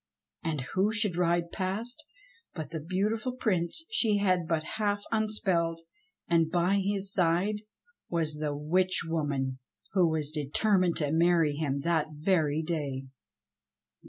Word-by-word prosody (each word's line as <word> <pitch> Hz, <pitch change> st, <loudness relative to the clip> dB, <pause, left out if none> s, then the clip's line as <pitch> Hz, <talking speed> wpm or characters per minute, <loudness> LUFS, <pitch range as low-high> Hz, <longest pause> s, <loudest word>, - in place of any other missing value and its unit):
And 160 Hz, -5 st, -1 dB
who 195 Hz, +3 st, +2 dB
should 220 Hz, -5 st, 0 dB
ride 170 Hz, -1 st, +1 dB
past 220 Hz, +10 st, -2 dB, 0.5 s
but 160 Hz, -2 st, -5 dB
the 160 Hz, -, -3 dB
beautiful 210 Hz, -, -1 dB
Prince 210 Hz, -, -1 dB
she 220 Hz, -, +3 dB
had 185 Hz, -4 st, +2 dB
but 160 Hz, -2 st, 0 dB, 0.2 s
half 205 Hz, -1 st, 0 dB
unspelled, 190 Hz, -7 st, 0 dB, 0.5 s
and 165 Hz, -2 st, +3 dB
by 180 Hz, +3 st, +2 dB
his 200 Hz, 0 st, -1 dB
side 185 Hz, +4 st, +1 dB, 0.5 s
was 155 Hz, -3 st, -1 dB
the 150 Hz, -2 st, -2 dB
witch 180 Hz, +5 st, +2 dB
woman 140 Hz, -5 st, -1 dB, 0.3 s
who 180 Hz, -4 st, +4 dB
was 155 Hz, -2 st, -1 dB
determined 175 Hz, +5 st, +2 dB
to 145 Hz, -2 st, 0 dB
marry 165 Hz, -2 st, +3 dB
him 140 Hz, -2 st, -1 dB
that 160 Hz, 0 st, +1 dB
very 155 Hz, -1 st, +1 dB
day. 145 Hz, -5 st, -3 dB
170 Hz, 130 wpm, -29 LUFS, 155-200 Hz, 0.5 s, who